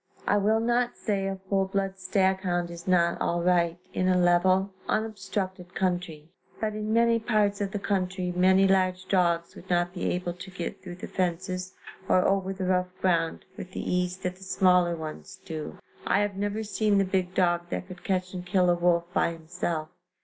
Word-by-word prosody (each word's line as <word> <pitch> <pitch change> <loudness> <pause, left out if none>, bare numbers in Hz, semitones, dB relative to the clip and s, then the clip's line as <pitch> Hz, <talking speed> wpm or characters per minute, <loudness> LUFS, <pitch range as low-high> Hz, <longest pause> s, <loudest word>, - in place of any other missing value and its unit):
I 205 - +3
will 215 +2 +3
not 240 +1 +1
say 195 -3 -1
a 195 - -2
full 195 0 0
blood 195 0 -2
stag 190 0 +2
hound 175 -2 -1
is 170 +2 -10
not 170 -2 +3
all 170 0 0
right, 170 -1 +2 0.2
in 185 - 0
a 185 0 +4
level, 185 +2 +3 0.2
unobstructed 195 -4 -3
country, 175 -4 -2 0.3
but 215 -1 -1
in 215 0 -3
many 230 0 +4
parts 210 -3 +1
of 200 - 0
the 205 - -3
country 185 -2 -1
many 190 +2 +5
large 185 -1 +1
dogs 170 -3 +1
would 185 - -13
not 175 0 +1
be 180 - -4
able 180 -1 -2
to 180 +2 -10
get 175 -2 -6
thru 180 -1 -8
the 185 - -7
fences 185 +1 -2 0.3
or 185 - +4
over 195 -1 +1
the 190 -1 -4
rough 180 0 +1
ground 170 -3 +1
with 185 0 -9
the - - -3
ease 180 0 0
that 185 -1 -4
the 190 - -13
smaller 180 -2 +3
ones 155 -1 -8
do. 160 +2 -6 0.3
I 200 - +3
have 205 -1 -1
never 205 +2 -2
seen 210 -1 +1
the 195 - +3
big 185 -1 -1
dog 175 -1 +2
that 185 - -4
could 185 -1 -11
catch 185 -1 -1
and 180 -1 -5
kill 180 0 +3
a - - +3
wolf 175 0 +2
by 175 - +2
himself. 165 -1 -4
185 Hz, 195 wpm, -27 LUFS, 175-195 Hz, 0.3 s, many